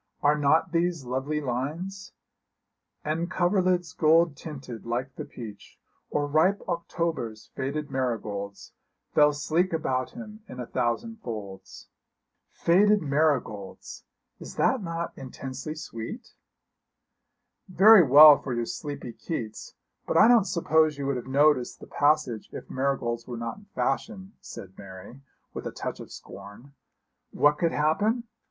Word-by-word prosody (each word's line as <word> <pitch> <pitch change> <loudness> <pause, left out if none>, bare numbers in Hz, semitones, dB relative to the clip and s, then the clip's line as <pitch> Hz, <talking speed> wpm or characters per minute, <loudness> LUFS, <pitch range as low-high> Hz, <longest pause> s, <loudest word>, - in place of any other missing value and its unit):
'Are 145 +1 +4
not 150 +4 +2
these 170 -4 0
lovely 135 +5 -2
lines 155 +9 -4 0.9
"And 165 +3 -1
coverlids 180 -3 +1
gold 160 0 +4
tinted 135 -8 -8
like 125 +3 -3
the - - -6
peach, 105 -4 -11 0.3
Or 145 - 0
ripe 160 +7 +2
October's 165 -10 -3
faded 140 +3 -3
marigolds, 105 -6 -4 0.4
Fell 150 0 +5
sleek 160 +5 0
about 130 -5 -1
him 215 -2 -10
in 125 - -9
a 125 - -4
thousand 225 - -2
folds." 105 - -8 0.6
Faded 205 +3 +3
marigolds! 140 -9 -1 0.4
Is - - -10
not 260 -6 +2
that 165 0 -3
intensely 135 +3 -7
sweet?' 155 - -8 1.4
'Very 200 +3 +8
well 150 0 +9
for 125 - -4
your 120 0 -1
sleepy 140 -2 -6
Keats, 110 -9 -6 0.3
but - - +1
I 215 - +8
don't 235 -4 +5
suppose 160 -4 +2
you 140 - -4
would 140 -1 0
have 125 - -7
noticed 140 -1 +2
the - - -11
passage 145 -6 +1
if - - -9
marigolds 130 -3 -1
were 120 -2 -5
not 115 0 -5
in 205 - -16
fashion,' 195 -3 -2
said 95 0 -10
Mary, 100 +6 -11 0.3
with - - -5
a - - -5
touch - - -5
of - - -10
scorn. 120 +8 -12 0.6
'What 150 0 +2
could 170 -1 +2
happen? 205 +11 +1
150 Hz, 135 wpm, -27 LUFS, 125-170 Hz, 1.4 s, well